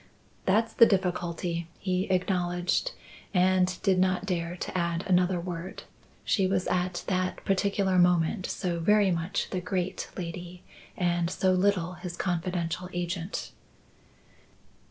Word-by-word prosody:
"That's 220 +4 +2
the 230 - +7
difficulty," 175 -3 -1
he 185 -1 -1
acknowledged; 180 - 0 0.4
and 185 0 +3
did 190 -3 +3
not 185 0 +2
dare 175 -2 -2
to - - -5
add 170 -1 0
another 180 -1 +3
word; 175 +1 -6 0.4
she 195 -3 +2
was 185 -1 0
at 180 0 -1
that 185 -1 -1
particular 195 -1 +2
moment 180 +2 +3
so 175 -3 -2
very 205 +3 +4
much 170 +2 -2
the 185 - -2
great 185 0 -2
lady, 175 0 -6 0.3
and 175 -1 +1
so 185 +1 +1
little 185 -2 +2
his 175 -1 -7
confidential 180 0 -2
agent. 175 +1 -3
180 Hz, 125 wpm, -28 LUFS, 175-190 Hz, 0.4 s, the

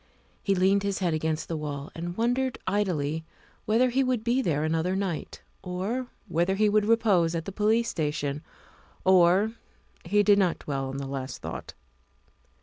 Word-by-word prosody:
He 195 - +1
leaned 190 +2 +3
his 200 -1 -1
head 175 -4 0
against 155 0 -1
the 165 - -3
wall 145 -2 -5
and 175 +1 -5
wondered 245 +2 0
idly 160 -6 0 0.4
whether 245 +4 +3
he 265 +2 +2
would 255 -4 0
be 240 +3 +2
there 155 - 0
another 165 +4 0
night, 190 -5 -3 0.2
or 200 +8 -3 0.2
whether 175 +4 +1
he 215 +2 +3
wold 210 0 +3
repose 205 -7 +3
at 165 -1 -3
the - - -5
police 220 +4 +2
station, 150 -2 -2 0.6
or 190 +3 +5 0.5
He 205 +4 +3
did 205 -1 +5
not 180 -4 +2
dwell 135 -2 -3
on 135 - -5
the 140 - -4
last 135 -1 -5
thought. - - -6
185 Hz, 165 wpm, -27 LUFS, 160-215 Hz, 0.6 s, or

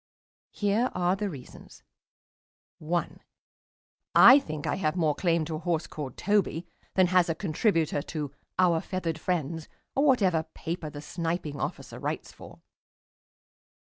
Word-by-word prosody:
Here 210 +5 +1
are 180 +1 +2
the 205 +1 -2
reasons: 135 -8 -12 1.0
1. 170 +2 -2 1.0
I 270 - +10
think 155 - -6
I - - 0
have 155 -4 0
more 160 -4 +2
claim 170 -1 +1
to 155 0 -3
a - - -7
horse 170 -1 -1
called 140 -5 -7
Toby 195 -5 +1 0.3
than 185 - +5
has 180 -2 +4
a 165 - 0
contributor 165 -3 +1
to 150 -2 -5 0.3
"Our 175 -3 +3
Feathered 170 -4 -3
Friends" 160 -2 -2 0.2
or 275 - +2
whatever 195 - +4
paper 165 -1 -4
the 145 -1 -8
Sniping 165 -3 -3
Officer - - -5
writes - - -4
for. - - -14
170 Hz, 140 wpm, -28 LUFS, 155-185 Hz, 1.0 s, I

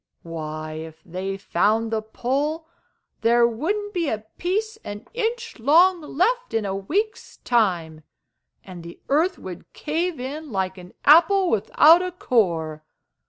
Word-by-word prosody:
Why, 155 -1 -6
if 160 0 -11
they 190 +2 -4
found 215 +4 +1
the 220 -1 0
Pole, 280 +8 -2 0.6
there 235 +1 +4
wouldn't 405 - -2
be 340 -5 0
a 215 0 -4
piece 430 +5 -1
an 205 0 -8
inch 465 - -3
long 340 +8 +5
left 445 - 0
in 220 -2 0
a 195 -1 -2
week's 390 - -3
time, 175 -10 0 0.6
and 180 -3 -10
the 170 0 -11
earth 325 +7 +2
would 180 -2 -10
cave 325 +1 -2
in 285 +3 -6
like 190 -2 -2
an 180 +1 -13
apple 350 +5 +6
without 300 - +5
a 365 0 -3
core! 170 - 0
240 Hz, 140 wpm, -23 LUFS, -, 0.6 s, apple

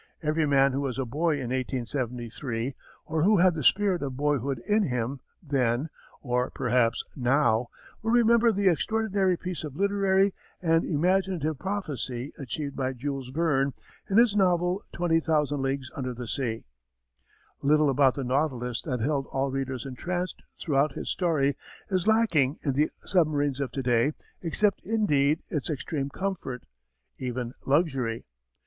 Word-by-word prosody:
Every 155 0 +1
man 135 -1 +4
who 135 +2 -1
was 135 -3 -2
a 135 - -1
boy 155 +7 0
in 130 -4 -3
1873, 125 -1 -3 0.3
or 160 0 -1
who 205 +5 +5
had 180 0 +5
the 160 - -3
spirit 190 +2 +3
of 135 -3 -4
boyhood 140 -2 0
in 210 +1 +3
him 125 - -1 0.2
then, 135 -1 0 0.3
or 125 -1 0
perhaps 125 -2 +1
now, 125 -3 +2 0.3
will 225 - -2
remember 235 0 +5
the 200 -1 +1
extraordinary 195 0 +1
piece 180 -2 -5
of 145 -3 -6
literary 195 0 +2 0.3
and 165 -1 +2
imaginative 170 -2 0
prophecy 145 - -4
achieved 140 +1 -4
by 130 -1 -1
Jules 135 0 -4
Verne 140 -2 +1 0.4
in 195 - +2
his 230 -3 +5
novel 180 0 +2
Twenty 170 -2 +2
Thousand 150 -3 +1
Leagues 135 0 -2
Under 130 -2 -3
the 125 +1 -6
Sea. 115 -3 -3 1.0
Little 150 0 +4
about 135 -1 +4
the 140 - -3
Nautilus 125 -2 -1
that 125 -7 -3
held 140 +2 0
all 135 0 -1
readers 130 -2 -3
entranced 175 +7 -4 0.2
throughout 145 -2 +1
his - - -4
story 150 -6 +1 0.4
is 185 0 0
lacking 175 - +3
in 140 - +2
the 150 +3 +2
submarines 145 -6 +1
of 130 -4 -2
to 135 - -3
day 120 +4 +2 0.3
except 200 +4 +1
indeed 155 -9 +2
its 150 0 -2
extreme 140 -1 -3
comfort, 165 -8 -4 0.6
even 125 -1 -3
luxury. 135 -6 +1
145 Hz, 150 wpm, -27 LUFS, 130-175 Hz, 1.0 s, who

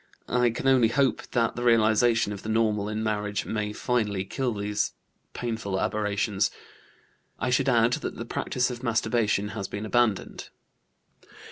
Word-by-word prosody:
I 125 -1 +2
can 115 +3 -3
only 130 -3 +5
hope 130 +2 +1
that 115 -2 +1
the 120 - -4
realization 115 -2 +3
of 100 - -8
the 110 - -6
normal 105 -2 +1
in 110 +1 -2
marriage 105 -1 -1
may 105 -1 -2
finally 105 -4 -1
kill 130 +5 -2
these 105 +1 -1 0.4
painful 110 -5 -3
aberrations. 105 -1 0 0.9
I - - -1
should 135 +2 +2
add 120 -1 +4
that - - -3
the - - -6
practice 125 0 -1
of 120 -1 -7
masturbation 110 -3 +1
has 100 -3 -4
been 105 +1 -5
abandoned." 115 -3 0
110 Hz, 150 wpm, -26 LUFS, 105-120 Hz, 0.9 s, only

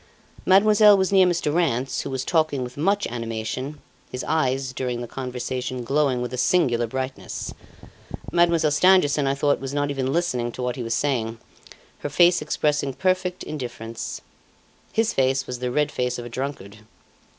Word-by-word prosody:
Mademoiselle 210 +1 +6
was 190 0 +1
near 190 -2 +6
Mr. 170 -4 0
Rance, 135 -6 0
who - - -5
was 130 -1 -3
talking 155 -6 +1
with 125 +1 -7
much 195 +7 +1
animation, 115 +5 -4 0.3
his 125 - -4
eyes, 135 -4 0
during 125 -2 -3
the 120 - -5
conversation, 125 0 -4
glowing 135 -1 +1
with 125 0 -5
a 125 - -3
singular 125 -7 +2
brightness. 130 +2 -5 0.8
Mademoiselle 170 -3 +3
Stangerson, 150 -3 +4
I 135 - +1
thought, 145 +1 +1
was 135 +1 -5
not 145 0 0
even 135 -1 -1
listening 130 -8 0
to 125 - -5
what 125 0 -1
he 130 - -5
was 115 -1 -1
saying, 115 -6 -1 0.6
her 145 - -4
face 175 +3 +4
expressing 150 -2 0
perfect 185 -1 0
indifference. 120 -5 -6 0.7
His 225 +1 +1
face 130 0 +1
was 125 -1 -6
the 125 0 -2
red 150 +4 0
face 125 0 -1
of 120 - -6
a - - -7
drunkard. 115 -5 -5
135 Hz, 165 wpm, -24 LUFS, 125-160 Hz, 0.8 s, Mademoiselle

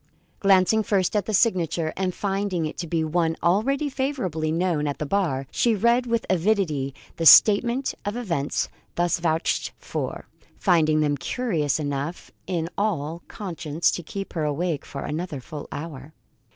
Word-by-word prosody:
Glancing 195 +2 +4
first 195 -2 0
at 205 -3 0
the 215 - -2
signature 170 -7 +1
and 185 -1 -2
finding 195 -4 -1
it 155 - -5
to 170 - -3
be 160 0 0
one 165 +1 0
already 245 - +2
favourably 255 - -2
known 165 -3 0
at 145 - -2
the 150 - -3
bar, 145 -6 0
she 235 -2 +2
read 235 +4 +2
with 230 -1 0
avidity 170 -8 +1 0.2
the 165 - -2
statement 235 - +6
of 205 +2 -3
events 170 - -1 0.3
thus 175 0 +1
vouched 165 0 0
for, - - -5 0.3
finding 155 -5 +3
them 145 -1 +1
curious 160 - -1
enough 145 +3 -4 0.2
in 170 -3 -1
all 170 -6 -1
conscience 165 -5 -1
to - - -3
keep 195 +4 -7
her 160 - -1
awake 150 +1 -1
for 140 - -6
another 155 -1 -4
full 145 +3 -8
hour. 150 -1 -7
175 Hz, 155 wpm, -24 LUFS, 155-200 Hz, 0.3 s, statement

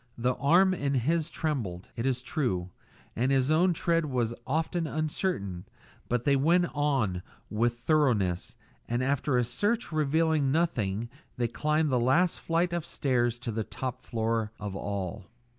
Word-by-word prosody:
The 125 +2 +1
arm 180 +6 +4
in 140 -5 -1
his 155 +6 +1
trembled, 115 - -3
it 115 +3 -1
is 125 -1 -1
true, 95 - -1 0.4
and 125 +4 +1
his 135 +1 +2
own 175 +4 +4
tread 165 0 +1
was 120 -4 0
often 160 +3 0
uncertain, 150 - -2 0.4
but 120 0 0
they 140 - +4
went 170 +6 +3
on 135 -11 0 0.3
with 120 +3 +1
thoroughness, 120 - +1 0.3
and 120 +2 0
after 135 0 +1
a 125 - +3
search 210 - -1
revealing 155 -1 +2
nothing 120 - 0 0.3
they 120 -1 +1
climbed 150 +4 0
the 125 - +3
last 160 +9 +3
flight 170 +1 0
of 170 -2 -1
stairs 120 -5 0
to 120 -1 -4
the 110 0 -2
top 130 +3 -5
floor 115 -2 -1
of 100 -2 -5
all. 100 -1 -4
130 Hz, 155 wpm, -29 LUFS, 115-160 Hz, 0.4 s, arm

